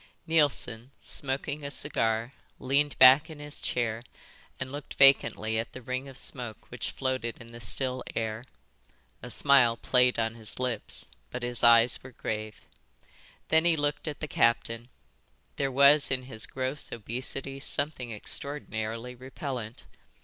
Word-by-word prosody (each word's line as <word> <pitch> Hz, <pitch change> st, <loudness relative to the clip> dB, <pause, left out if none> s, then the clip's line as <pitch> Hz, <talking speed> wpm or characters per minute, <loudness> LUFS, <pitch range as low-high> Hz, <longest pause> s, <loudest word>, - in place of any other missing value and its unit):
Neilson, 145 Hz, -7 st, +1 dB
smoking 140 Hz, +2 st, -4 dB
a 140 Hz, -, -4 dB
cigar, 115 Hz, -4 st, 0 dB, 0.2 s
leaned 140 Hz, +2 st, 0 dB
back 130 Hz, +5 st, +8 dB
in 155 Hz, -, -9 dB
his 150 Hz, 0 st, -7 dB
chair 115 Hz, -1 st, -2 dB, 0.6 s
and 130 Hz, -, -5 dB
looked 145 Hz, 0 st, -8 dB
vacantly 110 Hz, -5 st, +4 dB
at 115 Hz, -, -5 dB
the 130 Hz, -, -9 dB
ring 130 Hz, +3 st, -4 dB
of 135 Hz, -, -12 dB
smoke 120 Hz, -7 st, -2 dB
which -, -, -4 dB
floated 130 Hz, -3 st, -3 dB
in 115 Hz, 0 st, -13 dB
the 120 Hz, -, -10 dB
still 130 Hz, +3 st, 0 dB
air. 110 Hz, 0 st, -3 dB, 0.8 s
A -, -, -8 dB
smile 130 Hz, -5 st, +4 dB
played 125 Hz, +1 st, +2 dB
on 115 Hz, 0 st, 0 dB
his 110 Hz, -2 st, -3 dB
lips, 125 Hz, -4 st, -2 dB, 0.2 s
but 125 Hz, -, -6 dB
his 120 Hz, -1 st, -3 dB
eyes 115 Hz, 0 st, +5 dB
were 130 Hz, 0 st, -12 dB
grave. 110 Hz, -1 st, -5 dB, 0.8 s
Then 160 Hz, 0 st, +4 dB
he 170 Hz, -2 st, +3 dB
looked 145 Hz, +1 st, -1 dB
at 150 Hz, -2 st, -5 dB
the 155 Hz, -, -3 dB
captain. 115 Hz, -1 st, +1 dB, 0.7 s
There 135 Hz, -1 st, 0 dB
was 140 Hz, +2 st, +5 dB
in 130 Hz, -1 st, 0 dB
his 110 Hz, -4 st, -6 dB
gross 130 Hz, +2 st, -3 dB
obesity 130 Hz, +4 st, -5 dB
something 140 Hz, -3 st, 0 dB
extraordinarily 115 Hz, -1 st, -3 dB
repellent. 125 Hz, -2 st, -7 dB
130 Hz, 145 wpm, -28 LUFS, 115-140 Hz, 0.8 s, back